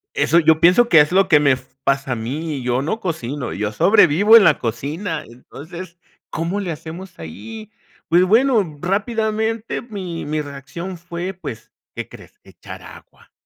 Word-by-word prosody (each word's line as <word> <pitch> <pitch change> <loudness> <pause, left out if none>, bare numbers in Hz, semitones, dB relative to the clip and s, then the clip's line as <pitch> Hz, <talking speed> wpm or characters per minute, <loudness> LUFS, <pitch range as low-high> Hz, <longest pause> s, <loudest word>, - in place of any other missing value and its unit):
Eso 150 +4 +3
yo 160 0 +4
pienso 185 +9 +5
que 160 - +7
es 150 - +1
lo 190 +1 +3
que 155 -5 +5
me 145 -2 +3
f 130 0 -4
pasa 135 -1 0
a - - -3
mí, 140 +6 -4
yo 125 +1 0
no 220 +10 -2
cocino, 145 - -4
yo 105 +3 -2
sobrevivo 205 - +5
en 220 - +9
la 155 -5 +4
cocina. 150 - -4
Entonces, 165 +9 -11 0.3
¿cómo 170 +5 -2
le 180 -4 -3
hacemos 165 +4 -9
ahí? 215 - -9 0.4
Pues, 175 +2 +5
bueno, 215 - +2
rápidamente 220 +3 -1
mi 190 -9 -6
mi 150 +1 -2
reacción 150 +6 -8
fue, 175 +2 -6
pues, 175 - -9 0.2
¿qué - - -5
crees? - - -15
Echar - - -12
agua. - - -16
165 Hz, 165 wpm, -20 LUFS, 145-195 Hz, 0.4 s, en